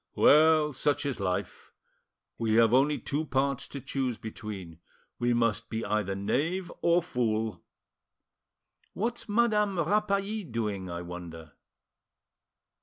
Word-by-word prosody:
Well, 155 0 +5
such 140 +3 0
is 140 -5 -2
life! 90 -2 -3 0.7
We 110 -1 +1
have 115 0 +5
only 140 +3 +4
two 145 +2 -2
parts 140 -2 -1
to 140 - -7
choose 130 -3 -2
between: 100 -6 -8 0.4
we 120 0 +1
must 115 -1 +1
be 110 0 -3
either 105 -2 -1
knave 160 - -1
or 170 0 +3
fool. 110 - -1 1.3
What's 235 +3 -3
Madame 210 -3 +2
Rapally 200 +4 0
doing, 105 -5 -2
I 85 0 -5
wonder?" 85 -3 -9
125 Hz, 115 wpm, -29 LUFS, 105-160 Hz, 1.3 s, Well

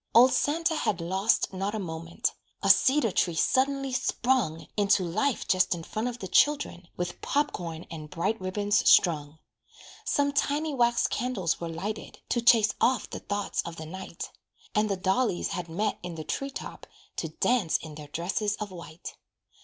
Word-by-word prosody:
Old 250 +3 +8
Santa 325 +3 +1
had 185 - 0
lost 190 +5 +1
not 195 +3 -2
a - - -2
moment. 165 -2 -3 0.3
A - - +8
cedar 265 -5 +4
tree 175 -2 +1
suddenly 270 +7 +1
sprung 240 -11 0
Into 205 -2 +3
life 215 +10 -1
just 185 -1 +3
in 165 - -7
front 215 +7 -3
of 245 -1 -4
the 195 - -6
children, 280 -5 +2
With 175 0 -4
pop 290 +1 +1
corn 165 -1 -6
and 155 -2 -7
bright 190 +6 -1
ribbons 205 +2 +2
strung. 150 -3 +4 0.7
Some 285 0 +1
tiny 295 +2 0
wax 240 -2 +3
candles 210 -11 -1
were 170 - -3
lighted, 195 +7 -5
To 240 - +1
chase 230 -2 +5
off 255 +1 +2
the - - -5
thoughts 205 0 -2
of 170 - -7
the 160 - -7
night; 185 +1 -7 0.4
And 210 0 +2
the 195 - 0
dollies 190 +1 +1
had 175 -2 -4
met 205 +6 -1
in 175 -2 -6
the 160 - -5
tree 275 - -3
top 275 - -8 0.3
To - - -2
dance 235 -10 +1
in 160 -2 -9
their 150 0 -9
dresses 185 +7 -1
of 210 -2 -6
white. 170 -1 -9
195 Hz, 175 wpm, -28 LUFS, 170-245 Hz, 0.7 s, Old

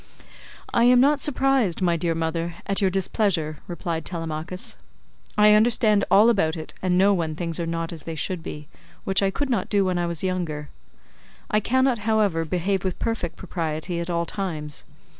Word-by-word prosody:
"I 235 - +4
am 250 0 +6
not 285 +3 +4
surprised, 270 - +2
my 175 -3 +2
dear 165 0 -1
mother, 165 +1 -2
at 195 0 0
your 195 - +3
displeasure," 185 -5 0
replied 170 -2 -4
Telemachus, 165 +1 -4 0.6
"I 210 0 +7
understand 215 -1 +4
all 215 +4 +6
about 160 -8 +1
it 155 - -8
and 180 -1 +1
know 200 +2 +5
when 165 -4 -1
things 165 0 -3
are 170 - -2
not 165 0 -3
as 160 - -6
they 165 - -5
should 175 +3 -2
be, 150 -2 -8 0.4
which 195 0 +2
I 195 - +2
could 275 +7 -2
not 235 - -1
do 200 -2 +2
when 180 -1 0
I 175 - 0
was 170 -1 -2
younger; 170 -6 -2 0.8
I 210 - +4
cannot, 260 +2 +1
however, 210 -6 +1
behave 185 +3 -1
with 185 -2 -2
perfect 190 -7 -3
propriety 170 -1 -4
at 170 +1 -4
all 170 -1 0
times. 160 -6 -4
180 Hz, 180 wpm, -24 LUFS, 165-210 Hz, 0.8 s, I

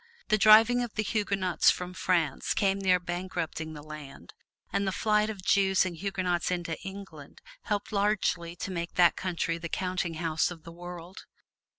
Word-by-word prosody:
The 215 - +4
driving 225 +4 +7
of 240 -3 -5
the 215 - 0
Huguenots 200 -4 +2
from 180 0 -1
France 170 -6 0
came 195 -1 +2
near 185 -2 +3
bankrupting 175 -3 -4
the 150 -1 -9
land, 150 -2 -10 0.4
and 200 - 0
the - - +1
flight 210 +2 +1
of 200 -4 -6
Jews 190 -1 +3
and 180 -2 -4
Huguenots 185 -1 -1
into 175 -2 -2
England 195 0 -10 0.3
helped 210 +1 -2
largely 200 -5 0
to 190 - -5
make 170 -1 -4
that 175 -1 +5
country 170 -2 -2
the 170 0 -6
counting 180 -2 -2
house 160 -1 0
of 170 -3 -10
the 170 - -10
world. 175 +1 -10
180 Hz, 170 wpm, -29 LUFS, 170-200 Hz, 0.4 s, driving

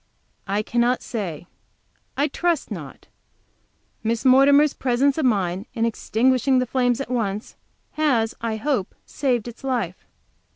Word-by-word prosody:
"I 200 +2 0
cannot 240 +2 +1
say; 180 -9 -5 0.7
I 285 - +2
trust 340 +1 -1
not. - - -8 1.0
Miss 225 +1 -1
Mortimer's 280 +3 +6
presence 265 +3 +1
of 305 - +1
mind 195 -3 0
in 230 - +1
extinguishing 255 +3 +1
the 255 - +2
flames 245 0 +1
at 275 -3 -5
once, 215 -4 -2 0.4
has, 250 -8 +1
I 230 -1 -2
hope, 225 -3 -2
saved 245 -5 -1
its 240 +2 -10
life." 235 -10 -3
245 Hz, 130 wpm, -23 LUFS, 220-270 Hz, 1.0 s, Mortimer's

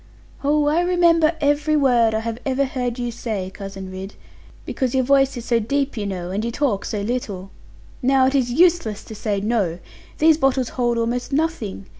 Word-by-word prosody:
'Oh, 295 +1 +2
I 305 +4 +2
remember 340 -2 +3
every 295 +1 +2
word 240 -5 +3
I 220 - 0
have 230 0 -4
ever 270 0 +1
heard 250 -2 -3
you 240 -1 -3
say, 215 -5 -4
Cousin 195 -1 -8
Ridd; 190 +2 -8 0.5
because 260 -1 -2
your 260 - +3
voice 270 0 +3
is 240 - -7
so 235 -2 +2
deep, 275 +5 -1
you 210 -3 -3
know, 180 -2 -4
and 205 +3 -2
you 235 - -1
talk 235 -5 -1
so 210 - -3
little. 200 -4 -4 0.5
Now 265 0 +4
it 265 - +1
is 255 -3 +1
useless 325 - +2
to - - -10
say 210 -1 -2
"no". 205 -6 0 0.4
These 315 0 +4
bottles 265 -3 +1
hold 240 -2 0
almost 235 +3 -2
nothing. 275 - -2
245 Hz, 190 wpm, -21 LUFS, 215-280 Hz, 0.5 s, Now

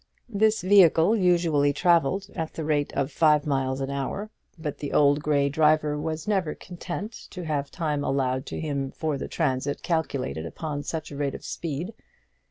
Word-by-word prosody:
This 215 -1 +2
vehicle 185 0 +6
usually 170 -7 +3
travelled 175 +3 +2
at 160 -3 -4
the 160 - -3
rate 150 -2 0
of 135 -1 -1
five 150 -2 +3
miles 135 -2 0
an 135 +1 -2
hour; 140 +10 -3 0.3
but 155 -3 -5
the 145 - -4
old 145 0 +4
grey 145 -2 +2
driver 150 0 +3
was 155 +2 -4
never 190 -7 0
content 185 +4 -6 0.2
to 180 - -7
have 145 -3 -2
time 150 -4 -2
allowed 130 -2 0
to - - -5
him 140 -3 -2
for 155 +1 -2
the - - -4
transit 140 -2 -1
calculated 135 - -2
upon 145 - -4
such 155 +1 -5
a - - -7
rate 140 -1 -2
of - - -9
speed. 165 +6 -4
150 Hz, 175 wpm, -26 LUFS, 140-170 Hz, 0.3 s, vehicle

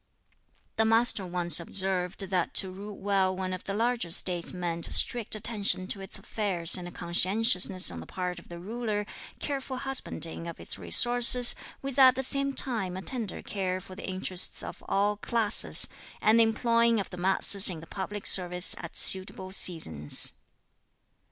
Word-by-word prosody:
The 220 - +1
Master 225 -3 +4
once 175 -2 +1
observed 185 +1 -2
that 185 -3 -3
to 190 - +3
rule 200 +2 -11
well 190 -2 -1
one 185 -1 -5
of 185 - -8
the 195 - -5
larger 230 -4 -2
States 175 0 -1
meant 170 -2 -5
strict 235 -3 +1
attention 205 -3 0
to 195 - -3
its 195 - -10
affairs 195 -5 -1
and 175 -1 -6
conscientiousness 185 - +2
on 85 - -9
the 80 - -12
part 180 -1 -6
of - - -20
the 170 - -10
ruler; 210 +2 -5 0.3
careful 270 -2 -6
husbanding 255 -11 -4
of 170 - -10
its - - -4
resources, 245 0 +5 0.3
with 275 0 -5
at 260 -1 +6
the 265 - -3
same 275 +1 0
time 195 -8 -2
a 190 - -8
tender 230 -6 -5
care 185 -2 -4
for 185 - -14
the 190 - -9
interests 185 -1 +1
of - - -10
all 205 +1 -1
classes; 220 0 +4 0.3
and 220 +2 +2
the - - +6
employing 230 0 0
of 200 - -6
the 180 - -9
masses 190 +2 +4
in 170 -3 -7
the 160 - -13
public 200 +3 -8
service 180 -1 +2
at 170 - -9
suitable 190 0 +1
seasons. 80 - +4
195 Hz, 165 wpm, -26 LUFS, 180-225 Hz, 0.3 s, at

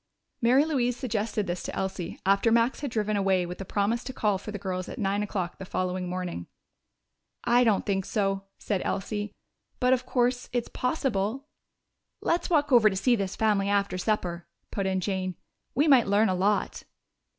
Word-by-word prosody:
Mary 255 +5 +5
Louise 250 -6 0
suggested 220 -3 -1
this 175 0 -3
to - - -5
Elsie 190 -3 -4
after 200 +4 +3
Max 235 +2 +3
had 285 - -3
driven 215 -2 -1
away 190 -2 +2
with 180 +2 -7
a - - -5
promise 210 +5 0
to 260 - -5
call 210 -6 0
for 205 - -9
the 210 - -4
girls 185 -1 -4
at - - -7
nine 200 -2 0
o'clock 190 -4 -3
the - - -6
following 185 0 -2
morning. 180 - -4 1.0
"I 245 +1 +4
don't 220 -5 +2
think 195 -2 0
so," 195 -2 -1
said 200 -3 -2
Elsie. 205 +1 -2 0.5
"But 250 0 +4
of 255 0 -1
course 245 0 +1
it's 245 -1 -1
possible." 250 -2 -1 0.7
"Let's 340 - 0
walk 295 -4 +2
over 235 -4 +7
to 190 - -4
see 240 +6 +3
this 195 -3 -3
family 205 -3 +2
after 200 -2 +1
supper," 180 -4 -1 0.2
put 195 -2 -1
in 190 -1 0
Jane. 185 -1 -2 0.4
"We 290 +5 +3
might 260 -7 +6
learn 205 +2 +3
a - - +2
lot." 200 +3 0
205 Hz, 185 wpm, -27 LUFS, 190-240 Hz, 1.0 s, over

